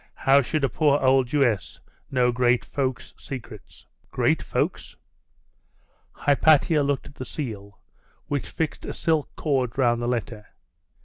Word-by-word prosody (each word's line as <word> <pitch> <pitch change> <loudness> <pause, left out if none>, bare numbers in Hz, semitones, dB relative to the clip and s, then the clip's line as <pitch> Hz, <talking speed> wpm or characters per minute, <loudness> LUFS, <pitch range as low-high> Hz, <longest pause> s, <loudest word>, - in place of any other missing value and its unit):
'How 140 +1 +4
should 150 +3 -2
a - - +4
poor 145 +3 +2
old 130 -1 +3
Jewess 120 -8 0 0.3
know 125 -2 +2
great 120 0 +2
folks' 130 -3 -3
secrets?' 130 -4 -10 0.2
'Great - - +1
folks? - - -3 0.6
' - - -41
Hypatia 150 +2 +4
looked 140 -1 -1
at - - -12
the 130 - -7
seal 105 -8 -6 0.5
which 145 -2 -3
fixed 160 -2 -3
a - - -5
silk 160 -3 0
cord 130 -5 -1
round 120 -3 +2
the 120 - -2
letter. 115 -3 -3
130 Hz, 140 wpm, -24 LUFS, 120-145 Hz, 0.6 s, How